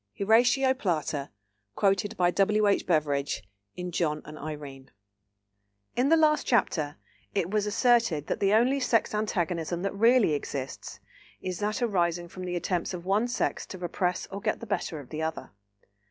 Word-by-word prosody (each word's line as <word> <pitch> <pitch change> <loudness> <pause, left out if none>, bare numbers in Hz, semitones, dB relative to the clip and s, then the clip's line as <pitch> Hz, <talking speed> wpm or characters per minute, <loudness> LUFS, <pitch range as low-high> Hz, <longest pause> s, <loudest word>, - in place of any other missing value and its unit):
—HORATIO 245 +6 +4
PLATA 155 - -2 0.5
(quoted 200 +2 +1
by 175 -1 +3
W. 210 +3 +2
H. 200 - +2
BEVERIDGE, 145 -7 0 0.3
in 180 0 -5
John 155 -3 -1
and 150 - -9
Irene). 145 -3 -8 1.1
In 255 +3 +2
the 330 - +6
last 305 -1 +3
chapter 155 - +1 0.4
it 185 -2 0
was 210 -1 +1
asserted 225 - +2
that - - -2
the 195 0 +2
only 245 +6 +4
sex 240 -5 +1
antagonism 175 -5 -1
that 195 - -1
really 230 -3 +4
exists 140 -2 -5 0.4
is 185 -1 -4
that 215 +4 -1
arising 175 -5 0
from 185 +1 -7
the 180 0 -3
attempts 175 +1 -1
of 175 0 -8
one 205 +5 +2
sex 245 - -2
to 190 - -8
repress 180 0 -1
or 200 +1 -5
get - - -1
the - - -7
better 180 -6 -2
of 135 -4 -12
the 155 - -4
other. 160 0 -4
185 Hz, 165 wpm, -28 LUFS, 160-215 Hz, 1.1 s, the